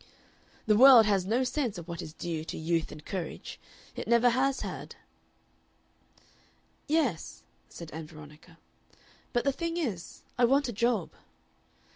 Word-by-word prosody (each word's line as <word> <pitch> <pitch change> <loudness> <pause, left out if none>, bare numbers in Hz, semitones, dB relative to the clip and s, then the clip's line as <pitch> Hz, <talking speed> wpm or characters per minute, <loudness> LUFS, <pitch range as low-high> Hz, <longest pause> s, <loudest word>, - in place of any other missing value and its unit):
"The 215 - +4
world 250 -1 +9
has 195 -3 +1
no 235 +5 +2
sense 250 -5 -2
of 170 -1 -8
what 170 -2 -5
is 155 - -8
due 160 -1 -4
to - - -6
youth 165 0 -1
and 150 0 -11
courage. 185 -4 -6 0.4
It - - -6
never 235 +1 +4
has 265 +2 +1
had." - - -6 1.9
"Yes," 285 - -1 0.3
said 170 -2 -10
Ann 160 0 -7
Veronica. 155 +2 -14 0.7
"But 240 - +1
the 275 - +2
thing 335 +4 -3
is, 215 - -4 0.2
I 245 - +6
want 275 +3 +3
a 240 - -4
job." 225 -3 0
215 Hz, 145 wpm, -29 LUFS, 165-255 Hz, 1.9 s, world